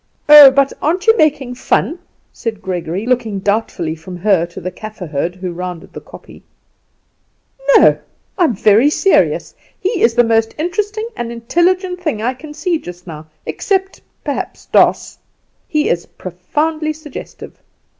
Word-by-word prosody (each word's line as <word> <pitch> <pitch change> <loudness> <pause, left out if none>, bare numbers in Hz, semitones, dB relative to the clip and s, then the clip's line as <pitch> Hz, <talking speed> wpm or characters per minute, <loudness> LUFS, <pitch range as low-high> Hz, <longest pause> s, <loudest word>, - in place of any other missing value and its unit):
"Oh, 295 -2 +11
but 275 +1 +1
aren't 355 +5 0
you 450 0 +6
making 290 - +1
fun?" 315 +6 -1 0.3
said 225 -3 -5
Gregory, 185 0 -4
looking 235 -5 0
doubtfully 200 -5 -1
from 165 +3 -9
her 180 -2 +2
to 170 - -10
the 185 - -5
Kaffer 215 0 -9
herd, 165 +3 -3
who 185 -1 -5
rounded 180 -1 -7
the - - -8
kopje. - - -14 1.3
"No; - - +6 0.4
I 360 - +3
am 245 - 0
very 215 +7 +4
serious. 390 +5 +1 0.3
He 390 +1 -1
is 230 0 +3
the 240 - +5
most 225 -1 +1
interesting 410 +7 -2
and 235 -7 -4
intelligent 360 - 0
thing 310 -11 -2
I 240 +4 -1
can 295 +3 -11
see 350 -2 -1
just 175 - -11
now, 155 -2 -9 0.2
except, 385 -1 -2 0.2
perhaps, - - -5
Doss. - - +2 0.5
He 305 -3 0
is 170 0 -1
profoundly 310 - -3
suggestive. 305 -2 -11
240 Hz, 150 wpm, -16 LUFS, -, 1.3 s, Oh